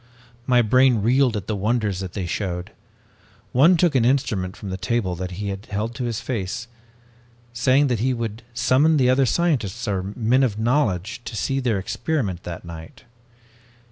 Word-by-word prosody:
"My 125 Hz, -2 st, +4 dB
brain 125 Hz, -1 st, +4 dB
reeled 125 Hz, 0 st, +3 dB
at 100 Hz, -, -5 dB
the 110 Hz, -, -2 dB
wonders 105 Hz, -2 st, 0 dB
that 95 Hz, -2 st, -6 dB
they 95 Hz, -3 st, -3 dB
showed. 90 Hz, 0 st, -3 dB, 0.8 s
One 160 Hz, +8 st, +5 dB
took 170 Hz, -1 st, +3 dB
an 130 Hz, -4 st, +3 dB
instrument 115 Hz, -8 st, 0 dB
from 100 Hz, -, -7 dB
the -, -, -2 dB
table 110 Hz, -3 st, -1 dB
that 90 Hz, +1 st, -4 dB
he 100 Hz, -1 st, -3 dB
held 105 Hz, +3 st, -2 dB
to 125 Hz, 0 st, -4 dB
his 115 Hz, -3 st, -2 dB
face, 115 Hz, -1 st, -4 dB, 0.9 s
saying 130 Hz, +4 st, +3 dB
that 125 Hz, -5 st, 0 dB
he 130 Hz, +4 st, +1 dB
would 115 Hz, -2 st, -4 dB
summon 145 Hz, +6 st, +3 dB
the 130 Hz, -2 st, +4 dB
other 130 Hz, 0 st, +3 dB
scientists 120 Hz, -, 0 dB
or 95 Hz, -2 st, 0 dB
men 110 Hz, +6 st, +1 dB
of 115 Hz, -6 st, +1 dB
knowledge 110 Hz, -4 st, 0 dB
to -, -, -6 dB
see 135 Hz, +5 st, -1 dB
their 120 Hz, -6 st, 0 dB
experiment 110 Hz, -, -2 dB
that 90 Hz, 0 st, -7 dB
night. 80 Hz, +5 st, -10 dB
115 Hz, 170 wpm, -23 LUFS, 100-130 Hz, 0.9 s, One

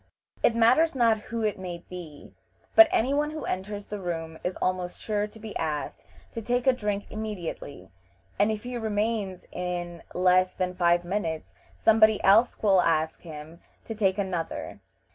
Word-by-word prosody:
It 230 Hz, -, +3 dB
matters 255 Hz, +8 st, +4 dB
not 230 Hz, -3 st, +3 dB
who 230 Hz, -1 st, -2 dB
it 210 Hz, -3 st, -1 dB
may 175 Hz, -2 st, -6 dB
be, 170 Hz, -5 st, -10 dB, 0.4 s
but 335 Hz, -, +9 dB
any 255 Hz, +5 st, +1 dB
one 295 Hz, +1 st, +1 dB
who 310 Hz, 0 st, -6 dB
enters 205 Hz, +2 st, -4 dB
the 210 Hz, -, -6 dB
room 165 Hz, -3 st, -4 dB
is 180 Hz, -, -2 dB
almost 180 Hz, -1 st, -2 dB
sure 210 Hz, -1 st, -1 dB
to 220 Hz, -, -15 dB
be 220 Hz, -1 st, -8 dB
asked 155 Hz, -2 st, -4 dB, 0.2 s
to 230 Hz, -, -5 dB
take 245 Hz, +2 st, 0 dB
a 265 Hz, -, +5 dB
drink 210 Hz, -4 st, -2 dB
immediately, 180 Hz, -, -6 dB, 0.5 s
and 205 Hz, +2 st, +4 dB
if 215 Hz, -1 st, -4 dB
he 245 Hz, 0 st, -4 dB
remains, 210 Hz, -3 st, -2 dB
in 175 Hz, -1 st, -4 dB
less 185 Hz, 0 st, +3 dB
than 180 Hz, -1 st, -2 dB
five 175 Hz, -1 st, +2 dB
minutes 175 Hz, -4 st, -3 dB, 0.2 s
somebody 220 Hz, -1 st, +5 dB
else 220 Hz, +6 st, +4 dB
will 195 Hz, -3 st, +5 dB
ask 160 Hz, -1 st, 0 dB
him 160 Hz, 0 st, -10 dB, 0.3 s
to 225 Hz, -, -5 dB
take 195 Hz, -3 st, +1 dB
another. 175 Hz, -, -3 dB
195 Hz, 165 wpm, -27 LUFS, 175-220 Hz, 0.5 s, but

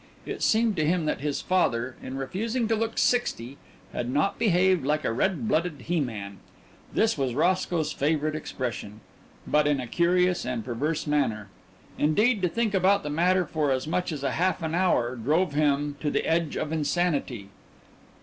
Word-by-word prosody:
It -, -, -5 dB
seemed 225 Hz, -1 st, +3 dB
to 155 Hz, -, +2 dB
him 165 Hz, +1 st, +1 dB
that -, -, -1 dB
his 145 Hz, -1 st, -2 dB
father, 130 Hz, -9 st, +1 dB
in 130 Hz, -, -6 dB
refusing 220 Hz, -, -2 dB
to 225 Hz, -, +3 dB
look 225 Hz, +1 st, -2 dB
sixty, 140 Hz, -, 0 dB, 0.4 s
had 120 Hz, -, -3 dB
not 150 Hz, +9 st, 0 dB
behaved 185 Hz, -, +3 dB
like 150 Hz, +2 st, 0 dB
a -, -, 0 dB
"red 190 Hz, -, 0 dB
blooded 170 Hz, -6 st, 0 dB
he 175 Hz, 0 st, -1 dB
man" 100 Hz, -7 st, -4 dB, 0.5 s
this 220 Hz, -7 st, +1 dB
was 130 Hz, -3 st, -1 dB
Roscoe's 170 Hz, -1 st, +1 dB
favourite 155 Hz, +1 st, 0 dB
expression 120 Hz, -8 st, -5 dB, 0.4 s
but 150 Hz, 0 st, +2 dB
in 145 Hz, -2 st, +2 dB
a 125 Hz, -, -3 dB
curious 180 Hz, +6 st, +2 dB
and 125 Hz, -4 st, -3 dB
perverse 145 Hz, +6 st, -2 dB
manner. 115 Hz, -9 st, 0 dB, 0.5 s
Indeed, 210 Hz, +9 st, +3 dB
to 180 Hz, -, +2 dB
think 225 Hz, +3 st, -1 dB
about 195 Hz, +1 st, +3 dB
the 150 Hz, -, -4 dB
matter 180 Hz, +4 st, +2 dB
for 150 Hz, -2 st, -1 dB
as 130 Hz, -1 st, 0 dB
much 175 Hz, +3 st, -1 dB
as 145 Hz, -3 st, -5 dB
a 135 Hz, -, 0 dB
half 185 Hz, 0 st, 0 dB
an 160 Hz, 0 st, -2 dB
hour 150 Hz, -9 st, +1 dB
drove 150 Hz, +8 st, +1 dB
him 145 Hz, -1 st, +1 dB
to 150 Hz, -, -1 dB
the -, -, -1 dB
edge 165 Hz, -2 st, 0 dB
of 155 Hz, -, -3 dB
insanity. 150 Hz, -, -1 dB
155 Hz, 180 wpm, -26 LUFS, 135-180 Hz, 0.5 s, seemed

